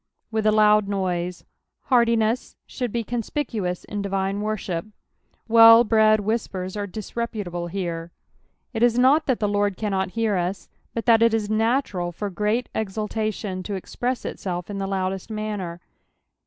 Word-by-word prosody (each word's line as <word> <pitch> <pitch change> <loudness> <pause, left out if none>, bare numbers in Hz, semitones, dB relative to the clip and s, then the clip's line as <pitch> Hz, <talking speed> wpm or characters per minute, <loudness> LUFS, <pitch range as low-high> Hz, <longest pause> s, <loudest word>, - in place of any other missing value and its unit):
" - - -53
With 220 -1 0
a - - +5
hud 210 -1 +4
noite." 180 -3 -2 0.5
Q^rtiness 230 -1 +2
should 245 -4 -4
be 235 +1 -1
conspicuous 225 -5 -3
in 205 -1 -5
divine 195 0 -1
worshi'^ 210 -2 -3 0.6
Well 230 0 +9
bred 215 -1 +4
whispers 195 -3 -3
are 205 -1 -3
disreputable 205 -4 -4
here. 170 -2 -4 0.6
It 225 - -3
is 240 0 +4
not 270 +6 +4
that 260 -4 +1
the 210 - +1
Lord 205 -2 0
cannonifsr 205 0 0
us, 180 +3 -3 0.3
but 230 - -2
that 230 -2 +5
it 230 -1 +5
is 215 -1 -2
natural 220 -5 0
fur 200 +4 -5
great 210 +6 0
einltation 215 -2 -3
to 200 +2 -4
express 245 +6 -3
itself 180 0 -4
in 200 - -4
the 195 - -2
loudest 190 +1 -2
manner. 210 -5 -4
210 Hz, 150 wpm, -24 LUFS, 190-225 Hz, 0.6 s, Well